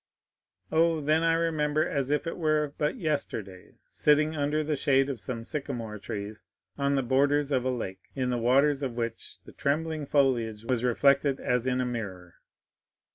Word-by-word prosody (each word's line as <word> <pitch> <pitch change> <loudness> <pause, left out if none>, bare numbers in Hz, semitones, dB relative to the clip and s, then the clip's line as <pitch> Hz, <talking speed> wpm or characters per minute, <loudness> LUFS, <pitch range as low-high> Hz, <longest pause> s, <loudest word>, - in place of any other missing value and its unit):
"Oh, 165 0 +3
then 155 +2 +2
I 165 0 +3
remember 155 -2 +1
as 140 -2 -1
if 150 +3 0
it 165 - -3
were 155 -3 0
but 150 - 0
yesterday 140 - -4 0.2
sitting 150 +1 +3
under 150 +1 0
the 150 0 -1
shade 135 0 +2
of 130 - -6
some 115 -3 -5
sycamore 115 -6 -5
trees, 105 +1 -6 0.3
on 140 0 +1
the 135 - +1
borders 140 +3 +2
of 130 -3 +1
a - - +1
lake, 95 -7 -5
in 130 -2 -1
the 120 - 0
waters 135 +4 +3
of 130 -4 -2
which 115 -1 -4
the - - -13
trembling 155 +1 -1
foliage 120 -7 +1
was 125 -1 0
reflected 140 +2 +3
as 125 0 0
in 130 0 +1
a 125 - +1
mirror. 95 -8 -5
140 Hz, 175 wpm, -28 LUFS, 120-150 Hz, 0.3 s, Oh